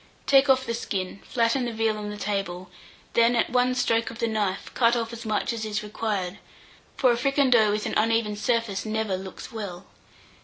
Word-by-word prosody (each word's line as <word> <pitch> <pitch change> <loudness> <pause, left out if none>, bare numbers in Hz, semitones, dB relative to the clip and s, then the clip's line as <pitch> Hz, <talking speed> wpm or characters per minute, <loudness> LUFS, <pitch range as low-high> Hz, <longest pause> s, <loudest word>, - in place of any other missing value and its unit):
Take 275 0 +5
off 260 0 +4
the 230 - -2
skin, 195 -4 -3
flatten 240 +1 +1
the 240 - -2
veal 220 -1 0
on 210 0 -5
the 210 - -6
table, 195 -3 -3 0.4
then 235 +1 +4
at 235 - +1
one 250 0 +2
stroke 230 -2 +1
of 230 - -9
the 230 - 0
knife, 205 -3 -2
cut 235 -1 +3
off 230 -1 -2
as 235 -1 -7
much 215 +2 0
as 225 -1 -4
is 215 0 -2
required, 210 -3 -3 0.6
for 255 -3 +4
a - - +2
fricandeau 250 -3 +3
with 210 +1 -1
an - - -2
uneven 225 -1 +2
surface 230 -2 0
never 220 -2 -1
looks 190 +6 -8
well. 200 -5 -6
225 Hz, 195 wpm, -26 LUFS, 210-235 Hz, 0.6 s, Take